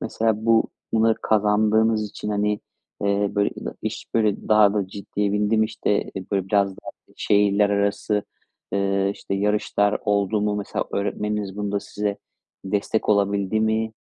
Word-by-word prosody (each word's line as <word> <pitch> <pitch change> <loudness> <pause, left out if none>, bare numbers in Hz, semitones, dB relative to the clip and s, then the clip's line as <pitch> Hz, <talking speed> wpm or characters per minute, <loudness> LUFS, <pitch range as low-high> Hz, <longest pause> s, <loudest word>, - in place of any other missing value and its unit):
mesela 110 0 -1
bu 115 -1 +4 0.3
bunları 115 0 +4
kazandığınız 110 +1 +2
için, - - -6
hani, 105 0 0 0.4
eee, 100 0 +1
böyle 100 0 +2
ina - - -6
iş - - -4
böyle 110 -3 +1
daha 105 -1 +5
da 100 -3 -1
ciddiye 100 +1 -3
bindi 105 +2 +1
mi? 110 - +4
İşte, 105 -1 -1 0.2
böyle, 95 -2 0
biraz 100 -1 +3
daha 95 - -10 0.3
şehirler 100 0 +3
arası, 100 +1 0 0.5
ııı, 100 0 +1
işte, 100 - -5
yarışlar 105 0 +1
oldu 105 +1 +1
mu? 105 0 0
Mesela 100 - -3
öğretmeniniz 105 0 -2
bunda 100 -1 -2
size 105 0 -3 0.5
destek 100 +3 -1
olabildi 100 0 +2
mi? 110 0 0
105 Hz, 145 wpm, -23 LUFS, 100-110 Hz, 0.5 s, daha